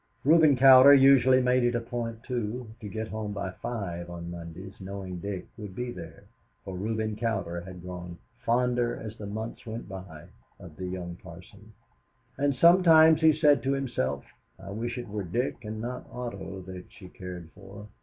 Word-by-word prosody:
Reuben 155 Hz, -1 st, +6 dB
Cowder 135 Hz, +2 st, +9 dB
usually 130 Hz, -1 st, +6 dB
made 125 Hz, 0 st, +3 dB
it 120 Hz, 0 st, +1 dB
a -, -, +1 dB
point, 115 Hz, -1 st, -5 dB
too, 120 Hz, -2 st, -4 dB
to 105 Hz, -3 st, -7 dB
get 110 Hz, +1 st, -4 dB
home 110 Hz, -1 st, -4 dB
by 100 Hz, -2 st, -4 dB
five 90 Hz, -5 st, -5 dB
on 85 Hz, 0 st, -7 dB
Mondays, 85 Hz, +3 st, -9 dB
knowing 95 Hz, -2 st, -6 dB
Dick 95 Hz, 0 st, -5 dB
would 105 Hz, -3 st, -8 dB
be 125 Hz, +2 st, -4 dB
there, 85 Hz, -6 st, -10 dB, 0.4 s
for 95 Hz, -, -6 dB
Reuben 110 Hz, +2 st, -2 dB
Cowder 105 Hz, -7 st, -2 dB
had 90 Hz, -1 st, -10 dB
grown 90 Hz, -1 st, -8 dB, 0.2 s
fonder 120 Hz, 0 st, +1 dB
as 110 Hz, -1 st, -7 dB
the 105 Hz, -2 st, -8 dB
months 110 Hz, +3 st, -6 dB
went 115 Hz, -1 st, -7 dB
by 95 Hz, -5 st, -9 dB, 0.3 s
of -, -, -12 dB
the 95 Hz, -, -5 dB
young 90 Hz, -1 st, -6 dB
parson, -, -, -14 dB, 0.6 s
and 140 Hz, 0 st, 0 dB
sometimes 165 Hz, -2 st, +6 dB
he 160 Hz, 0 st, +7 dB
said 150 Hz, -2 st, +4 dB
to 135 Hz, +1 st, 0 dB
himself, 120 Hz, -, -2 dB, 0.3 s
"I 100 Hz, +1 st, -10 dB
wish 120 Hz, +4 st, -4 dB
it 120 Hz, -1 st, -6 dB
were 105 Hz, 0 st, -4 dB
Dick 120 Hz, +7 st, -3 dB
and 110 Hz, 0 st, -6 dB
not 125 Hz, +3 st, -5 dB
Otto 100 Hz, -6 st, -6 dB
that 90 Hz, 0 st, -10 dB
she 95 Hz, -, -13 dB
cared 90 Hz, -2 st, -9 dB
for. 100 Hz, +1 st, -12 dB
110 Hz, 175 wpm, -28 LUFS, 95-125 Hz, 0.6 s, Cowder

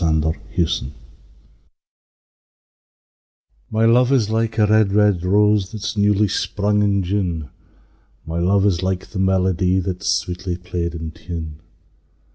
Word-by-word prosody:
A -, -, 0 dB
Red, 80 Hz, -2 st, +2 dB
Red 80 Hz, 0 st, 0 dB, 0.2 s
Rose 85 Hz, -3 st, +1 dB
O 65 Hz, -, -7 dB, 2.8 s
MY 110 Hz, +1 st, +1 dB
Luve 125 Hz, +3 st, +4 dB
's 110 Hz, -2 st, -2 dB
like 115 Hz, 0 st, -1 dB
a 105 Hz, -, +4 dB
red, 105 Hz, -1 st, +3 dB
red 105 Hz, -4 st, +3 dB
rose 105 Hz, +1 st, +2 dB
That 110 Hz, -3 st, -8 dB
's 105 Hz, +2 st, -3 dB
newly 105 Hz, 0 st, +2 dB
sprung 105 Hz, +1 st, 0 dB
in 100 Hz, -1 st, +1 dB
June: 90 Hz, -4 st, -2 dB
O -, -, -18 dB, 0.8 s
my 80 Hz, +1 st, -3 dB
Luve 100 Hz, +3 st, +3 dB
's 85 Hz, -1 st, -3 dB
like 95 Hz, 0 st, -3 dB
the 100 Hz, -, -5 dB
melodie 95 Hz, -1 st, +1 dB
That's 95 Hz, +1 st, -3 dB
sweetly 90 Hz, 0 st, -5 dB
play'd 85 Hz, -2 st, -4 dB
in 80 Hz, -1 st, -6 dB
tune! 80 Hz, -2 st, -8 dB
95 Hz, 150 wpm, -20 LUFS, 85-105 Hz, 2.8 s, Luve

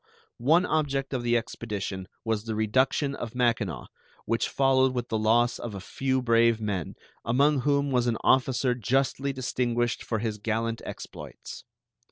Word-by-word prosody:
One 160 Hz, +9 st, +4 dB
object 140 Hz, -4 st, -1 dB
of 130 Hz, -, -1 dB
the 120 Hz, 0 st, +2 dB
expedition 105 Hz, -5 st, -4 dB, 0.2 s
was 110 Hz, -1 st, -1 dB
the 110 Hz, -1 st, -3 dB
reduction 130 Hz, +6 st, +1 dB
of 120 Hz, -3 st, -6 dB
Mackinaw, 115 Hz, -7 st, 0 dB, 0.4 s
which 115 Hz, -, 0 dB
followed 130 Hz, -1 st, +3 dB
with 120 Hz, -1 st, -3 dB
the 110 Hz, -, 0 dB
loss 115 Hz, +3 st, +2 dB
of 115 Hz, -4 st, -6 dB
a -, -, -5 dB
few 130 Hz, +6 st, -1 dB
brave 115 Hz, -1 st, +4 dB
men, 100 Hz, -7 st, -3 dB, 0.3 s
among 140 Hz, +5 st, +3 dB
whom 140 Hz, +1 st, +1 dB
was 125 Hz, -2 st, +2 dB
an 115 Hz, -2 st, +1 dB
officer 130 Hz, -1 st, +3 dB
justly 135 Hz, +4 st, 0 dB
distinguished 120 Hz, -2 st, -1 dB
for 110 Hz, -, -2 dB
his 110 Hz, -1 st, -3 dB
gallant 115 Hz, +2 st, -2 dB
exploits. -, -, -9 dB
120 Hz, 155 wpm, -27 LUFS, 115-130 Hz, 0.4 s, One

